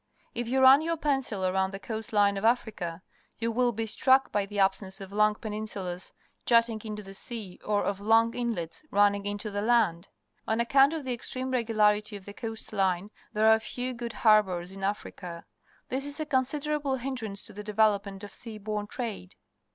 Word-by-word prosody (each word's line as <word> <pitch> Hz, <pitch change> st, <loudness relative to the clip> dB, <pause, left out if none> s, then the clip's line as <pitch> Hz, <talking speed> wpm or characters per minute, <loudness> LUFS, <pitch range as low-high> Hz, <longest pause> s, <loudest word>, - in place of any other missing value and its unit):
If 240 Hz, -1 st, -3 dB
you 265 Hz, +2 st, +1 dB
run 265 Hz, +2 st, +8 dB
your 330 Hz, +1 st, -1 dB
pencil 270 Hz, -10 st, 0 dB
around 190 Hz, +1 st, +1 dB
the 195 Hz, 0 st, -7 dB
coast 220 Hz, +1 st, -5 dB
Une 205 Hz, -1 st, +4 dB
of 195 Hz, -, -4 dB
.Africa, 210 Hz, -7 st, 0 dB, 0.3 s
you 230 Hz, 0 st, -1 dB
will 245 Hz, +1 st, +2 dB
be 225 Hz, 0 st, -3 dB
struck 260 Hz, +5 st, +3 dB
by 205 Hz, -1 st, 0 dB
the 205 Hz, 0 st, -7 dB
absence 195 Hz, 0 st, +1 dB
of 195 Hz, 0 st, -9 dB
long 210 Hz, 0 st, +3 dB
peninsulas 210 Hz, -5 st, -5 dB, 0.3 s
jutting 230 Hz, -2 st, +3 dB
into 210 Hz, -1 st, -6 dB
the 195 Hz, 0 st, -10 dB
sea 200 Hz, -2 st, -5 dB
or 205 Hz, -1 st, +1 dB
of 200 Hz, -1 st, -1 dB
long 225 Hz, +2 st, +4 dB
inlets 225 Hz, -, -3 dB
run 205 Hz, 0 st, +5 dB
ning 200 Hz, 0 st, -4 dB
into 205 Hz, +1 st, -4 dB
the 205 Hz, 0 st, -2 dB
land. 210 Hz, -6 st, +2 dB, 0.4 s
On 220 Hz, +1 st, +1 dB
account 270 Hz, +5 st, +5 dB
of 310 Hz, -4 st, -4 dB
the 255 Hz, -, -1 dB
ex 235 Hz, -, -4 dB
treme 260 Hz, 0 st, -3 dB
regularity 215 Hz, -3 st, +2 dB
jaL 195 Hz, -, -14 dB
the 205 Hz, -, -9 dB
coast 225 Hz, 0 st, -6 dB
line, 190 Hz, 0 st, 0 dB, 0.2 s
_ -, -, -2 dB
thei'e -, -, +3 dB
are 220 Hz, 0 st, +6 dB
few 250 Hz, +3 st, -3 dB
good 235 Hz, -1 st, -5 dB
harbours 190 Hz, -5 st, +4 dB
in 195 Hz, -, -10 dB
Afrij3.a. 185 Hz, -3 st, -4 dB, 0.5 s
This 270 Hz, +2 st, -2 dB
is 285 Hz, +1 st, -4 dB
a 310 Hz, -, -1 dB
considerable 285 Hz, +1 st, 0 dB
hin 265 Hz, +1 st, -3 dB
drance 215 Hz, -5 st, -5 dB
to -, -, -10 dB
the 210 Hz, +1 st, -7 dB
devel 215 Hz, 0 st, +4 dB
opment 200 Hz, 0 st, -9 dB
of 205 Hz, -, -9 dB
.sea 225 Hz, -2 st, -7 dB
borne 210 Hz, 0 st, -3 dB
trade. 215 Hz, -, -5 dB
215 Hz, 205 wpm, -28 LUFS, 200-240 Hz, 0.5 s, run